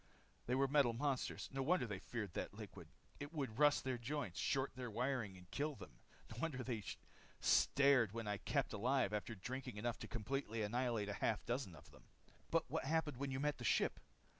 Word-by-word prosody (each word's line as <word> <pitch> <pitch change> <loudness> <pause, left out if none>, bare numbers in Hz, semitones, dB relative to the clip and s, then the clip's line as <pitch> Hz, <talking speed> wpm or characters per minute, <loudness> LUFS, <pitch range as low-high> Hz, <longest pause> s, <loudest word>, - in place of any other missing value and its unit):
"They 125 - +2
were 135 +1 +4
metal 135 -4 +4
monsters. 135 +2 -1
No 135 - -2
wonder 150 0 +3
they 100 -4 -4
feared 105 -4 -4
that - - -3
liquid. - - -8 0.3
It 145 +1 -5
would 135 -7 -3
rust 145 -1 +6
their 130 -2 -1
joints, 125 -6 -3
short 135 0 +1
their 125 -1 -4
wiring, 120 -4 -1
and 90 0 -14
kill 150 +1 -1
them. 70 - -11 0.3
No 110 - -7
wonder 135 -6 -1
they 115 -4 -2 0.6
stared 140 -6 +5
when 115 0 -4
I 105 0 0
kept 140 +5 0
alive 120 0 +2
after 110 +2 -2
drinking 125 +3 -5
enough 115 +2 -1
to - - -6
completely 115 -1 -2
annihilate 115 -1 0
a - - -1
half 110 - +1
dozen 120 -7 -2
of - - -14
them. - - -17 0.4
"But - - +2
what - - -1
happened 155 -2 +1
when 140 +1 -2
you 130 0 -2
met 150 +1 0
the - - -5
ship?" - - +2
125 Hz, 200 wpm, -40 LUFS, 110-140 Hz, 0.6 s, rust